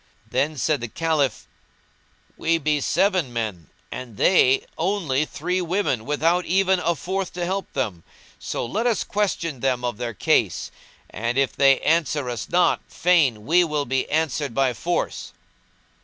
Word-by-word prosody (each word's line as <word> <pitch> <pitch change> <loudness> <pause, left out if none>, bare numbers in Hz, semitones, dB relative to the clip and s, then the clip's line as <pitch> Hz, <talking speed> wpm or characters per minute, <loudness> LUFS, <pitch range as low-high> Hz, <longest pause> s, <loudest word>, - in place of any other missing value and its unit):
Then 150 +1 -1
said 140 +1 0
the 120 - -3
Caliph, 150 -2 -1 0.9
"We 165 +1 +1
be 150 -1 0
seven 185 -8 +1
men, 105 - -4 0.2
and 120 -5 -7
they 135 - +4
only 165 -6 0
three 180 +5 -2
women 175 - -1
without 165 +5 +1
even 190 +1 +2
a 170 -1 0
fourth 190 +3 -3
to 175 -1 -3
help 190 +2 -3
them; 105 -11 -3 0.4
so - - -3
let 220 - -1
us 235 - +1
question 170 -8 -2
them 125 -1 0
of 120 -3 -2
their 120 -2 -4
case; - - +1 0.4
and, 120 +4 -2
if 135 -1 +1
they 135 -1 +5
answer 150 -5 +1
us 120 -3 -5
not, 175 +1 +3
fain 145 -12 +2
we 175 +3 +4
will 150 -3 -1
be 130 0 -1
answered 150 -4 -1
by 135 -2 +2
force." 175 +8 -3
150 Hz, 155 wpm, -23 LUFS, 125-175 Hz, 0.9 s, they